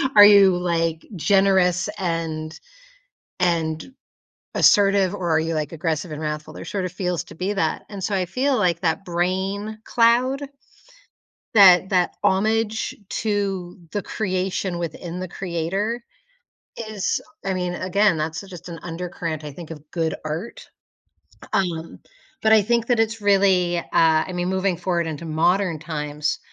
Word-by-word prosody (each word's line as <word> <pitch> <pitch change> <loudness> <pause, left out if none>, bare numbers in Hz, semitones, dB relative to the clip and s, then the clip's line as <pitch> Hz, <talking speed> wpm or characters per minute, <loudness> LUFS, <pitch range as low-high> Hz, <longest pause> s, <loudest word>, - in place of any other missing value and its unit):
Are 205 -1 +11
you, 200 -3 +7
like, 165 -2 -1
generous 190 0 +3
and 160 -3 -3 0.8
and 165 +5 0 0.6
assertive 195 -2 +4
or 185 -4 -3
are 160 -1 +3
you, 165 +1 -1
like, 155 0 -2
aggressive 160 0 -2
and 150 +1 -6
wrathful? 150 0 -4
There - - -9
sort 195 -3 -3
of 180 - -4
feels 180 -1 -2
to - - -13
be 185 +5 -2
that. 200 - -1
And 200 -2 -7
so 205 - 0
I 185 -1 0
feel 255 +9 0
like 175 -5 +1
that 165 +1 0
brain 190 +5 -2
cloud, 245 +4 +3 1.1
that 190 -3 +7
that 180 -3 +2
homage 220 +3 +1
to 195 -4 -2 0.2
the 205 - -2
creation 185 -3 -2
within 170 +1 -5
the 185 - -3
creator 195 +6 -3 0.9
is 210 -3 -1 0.3
I 195 - 0
mean, 180 -1 -2
again, 195 0 +2
that's 160 +2 -3
just 185 -3 -10
an 165 -2 -7
undercurrent, 165 -2 -5
I 150 - -6
think, 165 +3 -10
of 150 -1 -11
good 165 -2 -1
art. 155 +9 -6 0.9
U - - +5
um, 165 -3 -4 0.4
but 220 - +4
I 220 - +7
think 235 +2 +1
that 240 -3 +3
it's 225 0 0
really, 190 -3 +3
uh, - - -2
I 160 +2 +3
mean, 175 0 -1
moving 190 -1 0
forward 175 -1 -1
into 160 0 -5
modern 170 +2 +1
times 150 -1 -3
180 Hz, 150 wpm, -22 LUFS, 165-200 Hz, 1.1 s, Are